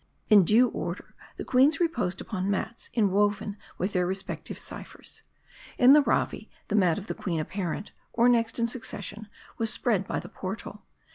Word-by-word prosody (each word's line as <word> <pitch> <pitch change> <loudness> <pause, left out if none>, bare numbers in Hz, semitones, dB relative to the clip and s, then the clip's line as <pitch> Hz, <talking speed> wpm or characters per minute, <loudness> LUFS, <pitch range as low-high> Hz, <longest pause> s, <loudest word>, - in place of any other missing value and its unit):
In 205 -3 +8
due 230 +8 +5
order, - - -5 0.2
the - - -5
queens 270 +5 +4
reposed 330 - 0
upon 195 -3 -3
mats 205 +4 -3
inwoven 205 -1 +2 0.2
with 190 +3 -2
their 180 -2 +1
respective 190 +1 -4
ciphers. - - -7 0.6
In 255 +2 +8
the 300 - +8
Ravi, - - -1 0.2
the 210 - 0
mat 180 -6 +3
of 205 - -6
4he - - -5
queen 170 -5 -2
apparent, 185 +4 -4 0.2
or 235 +1 +3
next 235 -2 +2
in 235 - +2
succession, 220 -3 -6 0.3
was 225 -1 +1
spread 200 -6 0
by - - -1
the - - -9
portal. 200 +2 -7
210 Hz, 165 wpm, -27 LUFS, 190-235 Hz, 0.6 s, In